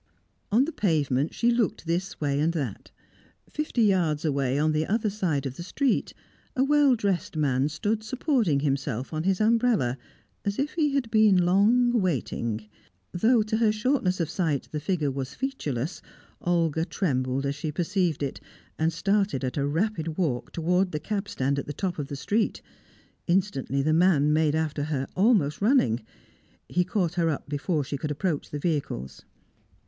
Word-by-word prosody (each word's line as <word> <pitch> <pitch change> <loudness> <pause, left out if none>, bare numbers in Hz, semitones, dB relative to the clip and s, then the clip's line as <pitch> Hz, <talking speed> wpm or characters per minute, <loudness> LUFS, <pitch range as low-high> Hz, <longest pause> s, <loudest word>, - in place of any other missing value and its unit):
On 240 +6 +4
the 325 - -4
pavement, 150 - +1
she 240 0 +1
looked 235 -7 0
this 175 +3 -2
way 140 -2 0
and 160 +3 +2
that. 135 - -4 0.6
Fifty 300 -6 -1
yards 170 -7 +2
away, 140 -3 +1
on 155 +2 +2
the 155 +1 0
other 215 0 0
side 170 -9 -1
of 130 -1 -5
the - - -6
street, 260 +9 0 0.4
a 260 - +3
well 290 -2 +4
dressed 195 -7 -1
man 140 -2 +1
stood 210 +9 -1
supporting 220 - +1
himself 135 -2 -2
on 155 +2 -2
his 190 -1 +2
umbrella, 220 - +2 0.4
as 200 0 -2
if 280 +2 -1
he 300 -4 +1
had 250 -5 -1
been 210 -5 +5
long 220 +7 +4
waiting; 115 - -2 0.4
though 220 +5 +3
to 215 +1 -1
her 225 -2 +3
shortness 215 -4 0
of 165 - 0
sight 160 -4 -1
the 150 - -2
figure 155 -3 -1
was 130 -1 -5
featureless, 160 - -3 0.4
Olga 165 -3 +1
trembled 135 -7 -1
as 140 - 0
she 150 +2 -4
perceived 175 -2 0
it, 135 - -4 0.4
and 160 +1 +2
started 195 -3 0
at 130 - -2
a 140 -1 0
rapid 165 0 -1
walk 145 -10 -1
towards 180 +3 +1
the 150 - -3
cabstand 150 -7 -2
at - - -6
the 145 - -4
top 175 +2 -3
of 145 - -3
the 140 - -5
street. 205 - -1 0.6
Instantly, 170 -7 0
the 155 +2 +2
man 155 -4 +4
made 155 -1 +2
after 155 -2 -1
her, 140 -3 -2
almost 190 - +3
running. 200 - +3 0.7
He 180 - +1
caught 180 -2 -1
her 170 -2 +1
up 150 - -3
before 145 +2 -1
she 140 +2 -4
could 150 - -4
approach 150 +1 -2
the 145 - -4
vehicles. 135 - -3
165 Hz, 170 wpm, -26 LUFS, 145-205 Hz, 0.7 s, been